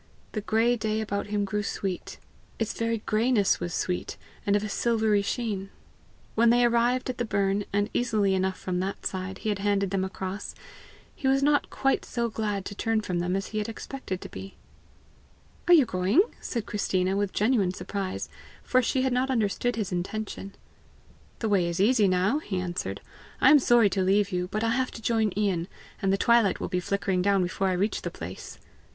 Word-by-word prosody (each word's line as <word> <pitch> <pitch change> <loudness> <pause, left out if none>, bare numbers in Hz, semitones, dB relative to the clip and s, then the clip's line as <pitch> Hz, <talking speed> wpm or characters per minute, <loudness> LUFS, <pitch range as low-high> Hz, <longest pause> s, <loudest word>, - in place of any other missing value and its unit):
The 215 - -3
gray 225 +3 +2
day 215 0 -1
about 200 -2 -2
him 205 -1 0
grew 210 +1 -1
sweet; 195 -2 -4 0.4
its 225 -1 -1
very 230 -1 -2
grayness 220 -2 +2
was 175 0 -3
sweet, 180 +2 -2 0.3
and 200 - +4
of 205 - +1
a - - -2
silvery 220 -1 +2
sheen. 200 -3 -3 0.6
When 230 +1 +4
they 240 +1 +5
arrived 240 +2 +2
at 245 - -12
the - - +1
burn, 200 -2 0
and, 205 0 +1
easily 215 -5 +1
enough 190 0 0
from 180 -1 -3
that 190 +2 -4
side, 190 0 -3
he - - +1
had 205 -2 -1
handed 200 -1 +1
them 195 -1 0
across, 190 +1 -5 0.6
he 275 - -2
was 270 +1 +3
not 290 0 +3
quite 270 0 +1
so 235 -1 -2
glad 210 -3 -2
to - - -5
turn 225 +2 0
from 180 -4 -2
them 180 +1 0
as 195 +1 -3
he 215 - -2
had 210 - -3
expected 225 -4 -6
to - - -8
be. 195 0 -9 1.1
"Are 350 - +7
you 295 -6 +6
going?" 190 - +3 0.2
said 230 -4 -3
Christina 190 -2 0
with 200 -1 0
genuine 210 -4 +2
surprise, 185 +1 -4 0.4
for 255 - +3
she 255 +2 0
had 260 -1 +1
not 255 +2 +1
understood 240 0 0
his 215 -4 -3
intention. 195 +2 -4 0.8
"The 220 - -2
way 190 -4 +3
is 170 0 -3
easy 215 0 +4
now," 185 +9 +2
he 195 -10 -3
answered. 175 - -4 0.4
"I 265 - +6
am 295 - +8
sorry 240 -5 +4
to 190 - 0
leave 200 +2 +2
you, 180 -1 -1
but 215 +4 -2
I 230 - +2
have 260 +1 +1
to 225 - -8
join 220 -2 +2
Ian, 190 -5 0 0.3
and 195 - +2
the 195 - +2
twilight 235 -2 +3
will - - -3
be 180 - 0
flickering 190 0 0
down 195 0 +3
before 180 +2 -1
I 185 - +1
reach 195 +4 0
the - - -3
place." - - -8
205 Hz, 200 wpm, -27 LUFS, 190-230 Hz, 1.1 s, am